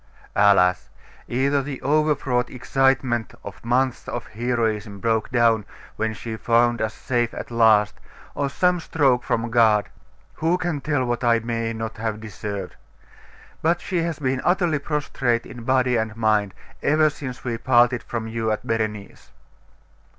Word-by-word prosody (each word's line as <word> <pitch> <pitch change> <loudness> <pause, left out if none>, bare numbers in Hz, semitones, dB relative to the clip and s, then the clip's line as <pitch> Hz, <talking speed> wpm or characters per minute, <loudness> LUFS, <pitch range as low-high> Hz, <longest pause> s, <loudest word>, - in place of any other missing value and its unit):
'Alas! 100 -3 +4 0.4
either 140 +3 +1
the 135 -1 -6
overwrought 140 -5 +1
excitement 130 -3 0
of - - -10
months 125 +2 0
of 120 - -4
heroism 110 -3 -2
broke 110 0 0
down 115 -4 +3 0.3
when 110 0 -1
she 110 0 -6
found 120 +1 +2
us 110 -1 -2
safe 120 -2 -1
at - - -7
last' 110 -3 +4 0.3
or 140 -1 -1
some 180 +5 +2
stroke 140 -7 +1
from 115 0 -1
God.... 110 -4 +4 0.5
Who 165 +3 +1
can 170 -5 -2
tell 145 -4 0
what 120 0 -2
I 120 -1 +4
may 115 0 -2
not 110 0 -5
have 110 -1 -3
deserved? 105 -3 -6 0.9
But 170 +2 +2
she 185 - -3
has 165 -2 -2
been 130 -3 -1
utterly 175 -4 +2
prostrate 135 -5 -1
in 120 -2 -10
body 130 -1 +2
and 110 0 -2
mind, 105 -3 +1 0.3
ever 155 +1 +3
since 130 -4 -8
we 120 -2 -3
parted 120 0 +3
from 115 -2 -5
you 110 0 -2
at 110 - -3
Berenice. 110 -2 -3
120 Hz, 150 wpm, -23 LUFS, 110-135 Hz, 0.9 s, Alas